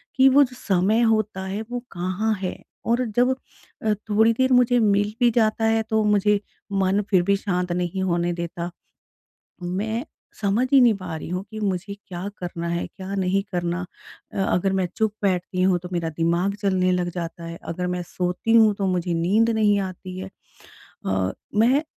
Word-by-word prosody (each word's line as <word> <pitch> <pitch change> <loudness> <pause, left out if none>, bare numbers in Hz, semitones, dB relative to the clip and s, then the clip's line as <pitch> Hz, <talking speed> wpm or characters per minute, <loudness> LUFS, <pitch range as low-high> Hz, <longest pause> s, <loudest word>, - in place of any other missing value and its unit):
कि 265 +1 +6
वो 280 +2 +6
जो 250 -2 -5
समय 200 +1 +2
होता 215 -4 +1
है 200 +3 -3
वो 245 - -2
कहाँ 185 +5 -1
है 185 - -2 0.3
और 240 +2 +2
जब 250 +2 +3 0.5
अ, 215 - +3 0.2
थोड़ी 220 +2 +4
देर 260 +2 +2
मुझे 245 0 +4
मिल 205 -1 +2
भी 245 -1 +5
जाता 225 -1 +2
है। 225 0 +3
तो 220 -1 +2
मुझे 210 0 +3 0.3
मन 195 +1 +2
फ़िर 185 -4 +4
भी 200 +2 +3
शांत 180 -3 -2
नहीं 180 +1 -1
होने 175 -1 +1
देता 170 0 -4 0.9
मैं 210 +7 -2 0.4
समझ 210 +4 +2
ही 275 - +8
नहीं 235 -3 +6
पा 185 -4 -6
रही 155 - -7
हूँ 180 +2 -2
कि 215 -1 -6
मुझे 200 0 -2
क्या 190 -2 -7
करना 170 -1 -4
है 170 0 -1
क्या 195 0 -7
नहीं 195 0 +1
करना। 175 0 -1 0.5
अ, - - -4
अगर 190 +2 +1
मैं 190 -1 +1
चुप 220 -2 +1
बैठती 185 -1 0
हूँ, 185 -1 +3
तो 180 +1 -9
मेरा 170 -2 -1
दिमाग 170 +4 +1
चलने 185 -2 +2
लग 180 -1 0
जाता 170 -1 -5
है। 165 0 -7
अगर 180 +2 -2
मैं 180 0 -2
सोती 180 +5 -2
हूँ 220 -2 +6
तो 200 -1 -2
मुझे 180 -2 0
नींद 200 +8 +2
नहीं 210 -2 +3
आती 185 -1 -6
है 190 +1 -5 0.8
अ, 95 -1 0 0.2
मैं 250 +8 +4
195 Hz, 185 wpm, -23 LUFS, 180-220 Hz, 0.9 s, ही